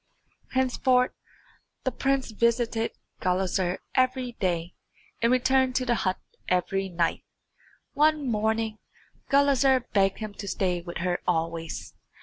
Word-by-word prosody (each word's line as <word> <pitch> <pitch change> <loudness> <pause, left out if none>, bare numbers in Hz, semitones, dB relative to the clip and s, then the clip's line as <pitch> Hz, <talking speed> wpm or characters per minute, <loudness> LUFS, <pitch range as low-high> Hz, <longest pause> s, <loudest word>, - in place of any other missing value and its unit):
Henceforth 255 -1 +2 0.7
the 260 - 0
prince 270 -3 0
visited 230 0 +1 0.3
Gulizar 185 0 0 0.2
every 255 -1 +1
day 175 -2 -1 0.5
and 230 +1 +3
returned 255 0 +3
to 255 - +1
the 245 - +2
hut 185 -5 0 0.3
every 190 +2 0
night. 170 -2 0 0.7
One 305 -1 +3
morning 220 -1 0 0.5
Gulizar 275 -2 +4
begged 195 -2 +3
him 215 -2 -6
to 200 0 -8
stay 180 -2 0
with 175 0 -6
her 175 -1 0
always. 165 - -2
220 Hz, 120 wpm, -27 LUFS, 185-255 Hz, 0.7 s, Gulizar